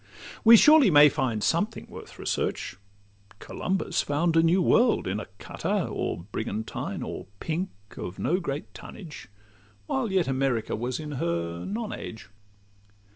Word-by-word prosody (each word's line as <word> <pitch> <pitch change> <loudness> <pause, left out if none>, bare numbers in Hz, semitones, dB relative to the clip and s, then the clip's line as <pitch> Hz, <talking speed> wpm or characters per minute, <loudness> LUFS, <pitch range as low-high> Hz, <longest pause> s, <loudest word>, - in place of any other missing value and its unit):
We 230 +1 +10
surely 300 -1 +7
may 150 -2 +8
find 130 -7 -1
something - - 0
worth - - -11
research: - - -2 0.6
Columbus 190 - -2
found 165 +3 0
a 165 - +6
new 165 +3 +3
world 230 +6 +3
in 95 +3 -1
a - - -7
cutter, - - -2
Or 85 - -3
brigantine, 110 0 -4
or - - -6
pink, 170 +4 -2 0.3
of 90 +2 -6
no 180 +3 0
great 145 -5 -5
tonnage, 170 -7 -10 0.6
While 245 - -1
yet 190 -3 +2
America 130 -4 0
was 120 +5 -3
in 150 -1 -6
her 85 -8 -2
non 220 +2 -4
age. 110 -4 -8
150 Hz, 140 wpm, -27 LUFS, -, 0.6 s, We